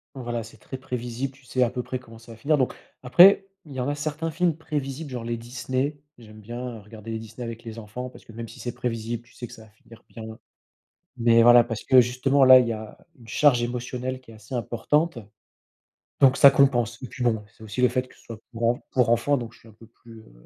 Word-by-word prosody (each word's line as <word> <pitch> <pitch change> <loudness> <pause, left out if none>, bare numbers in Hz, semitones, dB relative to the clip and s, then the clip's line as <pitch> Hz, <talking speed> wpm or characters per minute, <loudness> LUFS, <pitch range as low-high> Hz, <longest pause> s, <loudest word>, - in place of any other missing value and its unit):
voilà, 120 -3 -4
c'est 115 - -14
très 130 - -8
prévisible, 125 +1 -5
tu 135 0 -22
sais 130 0 +1
à 120 - 0
peu 125 -1 -3
près 130 - -4
comment 115 -2 -14
ça 115 0 -13
va - - -14
finir 150 +6 +1
donc, 130 - 0 0.3
après, 185 +9 +6 0.2
il 150 - -14
y 130 - -5
en 125 - -1
a 145 - -1
certains 155 +2 -3
films 170 0 0
prévisibles, 145 -2 -5
genre 125 -2 -5
les 115 0 -3
Disney, 130 +4 -3 0.2
j'aime 110 -1 -14
bien, 120 +3 -6
heu, 105 - -12
regarder 110 +1 -12
les 110 - -3
Disney 110 +2 -9
avec 115 0 -7
les 115 0 -8
enfants, 125 +4 -7
parce - - -15
que - - -15
même 115 +1 -7
si 115 - -13
c'est 120 -1 -5
prévisible, 115 -1 -4
tu 120 - -24
sais 120 - -8
que - - -14
ça 110 - -13
va 110 - -18
finir 110 +1 -18
bien. 110 -1 -9 0.8
Mais 115 -1 +4
voilà, 120 0 +8
parce 115 -2 -6
que 130 -1 +7
justement 130 +3 +2
là, 130 0 +10
il 120 - 0
y - - 0
a 110 -1 -8 0.2
une 115 - -17
charge 125 0 +3
émotionnelle 125 +1 -4
qui 120 - -17
est - - -13
assez 110 +4 -11
importante. 125 +6 0 1.0
Donc 135 -1 +6
ça 140 +2 +9
compense. 120 -4 +2
Et 130 - -6
puis 125 - -5
bon, 110 -3 +1
c'est 110 - -15
aussi 110 +3 -5
le 125 - +6
fait 125 +1 -1
que - - -19
ce - - -22
soit 115 -1 -9
pour 115 0 -4
enf 120 - -2
pour 125 -3 +2
enfant, 130 +5 +2
donc 120 -3 -6
je 115 - -19
suis 115 - -18
un - - -16
peu 110 +2 -17
plus, 115 0 -16
heu, 85 - -19
120 Hz, 255 wpm, -25 LUFS, 115-130 Hz, 1.0 s, là